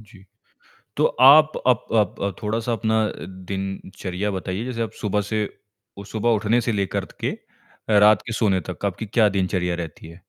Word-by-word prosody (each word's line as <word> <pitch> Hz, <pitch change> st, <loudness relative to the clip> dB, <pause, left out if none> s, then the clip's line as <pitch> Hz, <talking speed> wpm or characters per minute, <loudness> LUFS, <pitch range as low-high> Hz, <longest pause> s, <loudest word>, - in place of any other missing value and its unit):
जी। 100 Hz, -3 st, -17 dB, 0.7 s
तो -, -, +3 dB, 0.2 s
आप 155 Hz, +4 st, +8 dB, 0.2 s
up 125 Hz, -3 st, +3 dB
up 105 Hz, -4 st, 0 dB
अ, 100 Hz, 0 st, 0 dB
थोड़ा-सा 115 Hz, +3 st, -1 dB
अपना 110 Hz, -1 st, +1 dB, 0.5 s
दिनचर्या 95 Hz, 0 st, -4 dB
बताइए, 95 Hz, +4 st, -4 dB
जैसे 120 Hz, -2 st, -4 dB
आप 110 Hz, -1 st, -2 dB
सुबह 105 Hz, 0 st, 0 dB
से 105 Hz, +1 st, -1 dB, 0.5 s
उस 100 Hz, 0 st, -10 dB
शुभ 110 Hz, 0 st, -4 dB
उठने 115 Hz, +1 st, +2 dB
से 115 Hz, -, -1 dB
लेकर 100 Hz, -2 st, -1 dB
त -, -, -17 dB
के -, -, 0 dB, 0.7 s
रात 105 Hz, -1 st, +6 dB
के 110 Hz, -, -4 dB
सोने 100 Hz, -5 st, +2 dB
तक 90 Hz, -, -5 dB
आपकी 100 Hz, +3 st, -3 dB
क्या 105 Hz, 0 st, +3 dB
दिनचर्या 90 Hz, -2 st, -1 dB
रहती 80 Hz, -2 st, -7 dB
है? 85 Hz, -, -13 dB
105 Hz, 175 wpm, -23 LUFS, 95-110 Hz, 0.7 s, आप